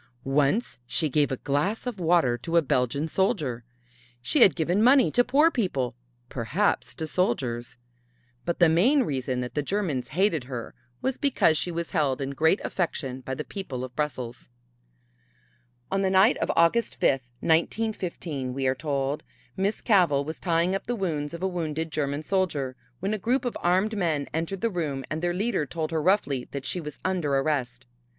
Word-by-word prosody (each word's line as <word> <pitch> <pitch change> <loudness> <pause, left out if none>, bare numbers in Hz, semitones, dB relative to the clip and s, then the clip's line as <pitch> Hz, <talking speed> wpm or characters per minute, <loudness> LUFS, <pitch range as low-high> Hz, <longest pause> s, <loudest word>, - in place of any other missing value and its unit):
Once 145 - +1
she 155 +3 0
gave 145 0 +2
a 130 - -1
glass 150 - -1
of 245 -6 -4
water 165 -8 +3
to 165 +8 -1
a - - +6
Belgian 130 +3 0
soldier. 155 - 0 0.6
She 125 +1 +1
had 195 - +7
given 175 +4 +1
money 255 +3 +5
to 245 - +4
poor 290 +7 +4
people, 160 - -1 0.3
perhaps 145 - -1
to 160 - -4
soldiers. 120 -6 -1 0.7
But 170 - -2
the 175 - +6
main 235 - +4
reason 130 - -2
that 125 - -5
the 150 - 0
Germans 155 -6 -2
hated 170 -3 +1
her 125 -3 -6 0.3
was 265 -1 -1
because 265 - +3
she 165 - 0
was 170 -1 -4
held 140 -4 +1
in 135 0 -3
great 160 +7 +3
affection 135 -7 -2
by 130 +1 -4
the - - -4
people 140 -11 -6
of 125 -1 -8
Brussels. 125 - -4 1.4
On 195 0 +1
the 190 - +2
night 190 +6 +5
of - - -2
August 170 +8 +2
fifth, 130 -2 +1
1915, 165 - -1
we 135 -1 -2
are 130 - +3
told, 140 0 -2 0.3
Miss 195 +3 -1
Cavell 170 - +3
was 160 +2 -6
tying 170 +1 +1
up 195 - -3
the 245 - 0
wounds 155 -8 -2
of 170 - -7
a - - +2
wounded 160 -3 -3
German 145 0 -2
soldier, 155 -8 -1 0.3
when 195 +3 -1
a 215 - -2
group 250 +6 0
of 245 - -2
armed 190 +5 +2
men 160 -8 0
entered 165 +4 -2
the 230 - +1
room 150 -7 -3
and 155 +1 -2
their 175 0 +1
leader 195 - 0
told 160 +3 -3
her 160 -1 0
roughly 150 -8 +1
that 140 -1 -6
she 180 - -2
was 150 -2 -7
under 175 -7 0
arrest. 135 -3 -1
160 Hz, 180 wpm, -26 LUFS, 135-190 Hz, 1.4 s, had